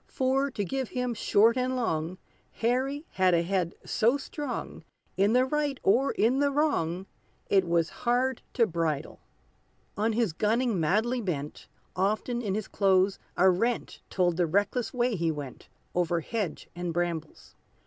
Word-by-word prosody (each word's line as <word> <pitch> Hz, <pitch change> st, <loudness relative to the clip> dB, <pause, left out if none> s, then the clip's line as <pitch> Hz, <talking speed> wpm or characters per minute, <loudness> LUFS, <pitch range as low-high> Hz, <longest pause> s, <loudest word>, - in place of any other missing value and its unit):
For, 270 Hz, +2 st, +1 dB
to 205 Hz, -6 st, -3 dB
give 265 Hz, +2 st, -3 dB
him 250 Hz, -1 st, -2 dB
short 225 Hz, +1 st, +3 dB
and 255 Hz, 0 st, 0 dB
long, 175 Hz, -7 st, -1 dB, 0.4 s
Harry 265 Hz, +6 st, -1 dB
had 185 Hz, -2 st, +3 dB
a 170 Hz, -, +2 dB
head 180 Hz, -1 st, -1 dB
so 235 Hz, +5 st, +2 dB
strong, 285 Hz, -2 st, -6 dB, 0.3 s
In 200 Hz, +3 st, +3 dB
the 250 Hz, +1 st, +4 dB
right 290 Hz, -1 st, -1 dB
or 250 Hz, +8 st, +3 dB
in 245 Hz, +5 st, +2 dB
the 285 Hz, 0 st, +3 dB
wrong, 195 Hz, -, 0 dB, 0.5 s
It 190 Hz, -3 st, +4 dB
was 170 Hz, -1 st, +2 dB
hard 250 Hz, +1 st, +1 dB
to 235 Hz, -, +4 dB
bridle. 160 Hz, -5 st, -2 dB, 0.8 s
On 220 Hz, +2 st, +1 dB
his 220 Hz, -6 st, +1 dB
gunning 220 Hz, +2 st, +1 dB
madly 220 Hz, +10 st, +1 dB
bent, 150 Hz, -8 st, -4 dB, 0.3 s
Often 215 Hz, +6 st, 0 dB
in 200 Hz, -4 st, -2 dB
his 215 Hz, -1 st, -3 dB
clothes 190 Hz, -1 st, +2 dB, 0.2 s
a 190 Hz, -, +5 dB
rent 230 Hz, +6 st, -1 dB
Told 175 Hz, -3 st, +1 dB
the 175 Hz, -2 st, +2 dB
reckless 205 Hz, +7 st, 0 dB
way 245 Hz, -2 st, 0 dB
he 170 Hz, -2 st, 0 dB
went, 145 Hz, -4 st, -8 dB, 0.2 s
Over 175 Hz, -1 st, +1 dB
hedge 205 Hz, -2 st, -4 dB
and 175 Hz, 0 st, -3 dB
brambles. 165 Hz, -2 st, -3 dB
210 Hz, 155 wpm, -28 LUFS, 175-250 Hz, 0.8 s, a